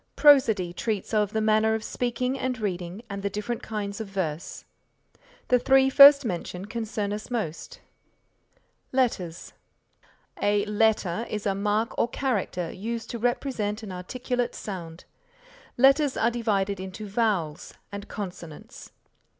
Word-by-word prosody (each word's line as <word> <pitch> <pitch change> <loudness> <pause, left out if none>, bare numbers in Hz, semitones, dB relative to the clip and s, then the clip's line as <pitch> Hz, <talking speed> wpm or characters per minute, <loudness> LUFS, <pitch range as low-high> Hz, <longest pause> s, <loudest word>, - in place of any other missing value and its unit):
Prosody 225 -12 +5
treats 215 +2 -3
of 210 -2 +2
the 220 - 0
manner 220 0 +3
of 220 - -4
speaking 250 +2 -2
and 260 -1 -2
reading 185 0 -4
and 200 -2 -5
the 200 - -1
different 220 +4 -4
kinds 210 -1 -4
of 220 - -5
verse. 175 -5 -4 0.8
The 250 - +5
three 265 +1 +4
first 280 0 +9
mentioned 180 0 -4
concern 215 -3 -3
us 210 +1 -6
most. 235 - -4 1.1
LETTERS 210 -11 -1 0.9
A 205 0 +2
letter 210 -1 +1
is 210 -1 -4
a 200 - +2
mark 210 +3 0
or - - +3
character 210 -10 -2
used 230 +4 -5
to 235 - -5
represent 225 -3 -1
an 205 - -7
articulate 245 +7 -3
sound. 170 -4 -7 0.7
Letters 275 +2 +4
are 230 +2 +2
divided 200 -5 -1
into 190 +3 -7
vowels 195 -8 -1 0.2
and 200 0 -7
consonants. 180 -6 -8
215 Hz, 135 wpm, -26 LUFS, 195-240 Hz, 1.1 s, first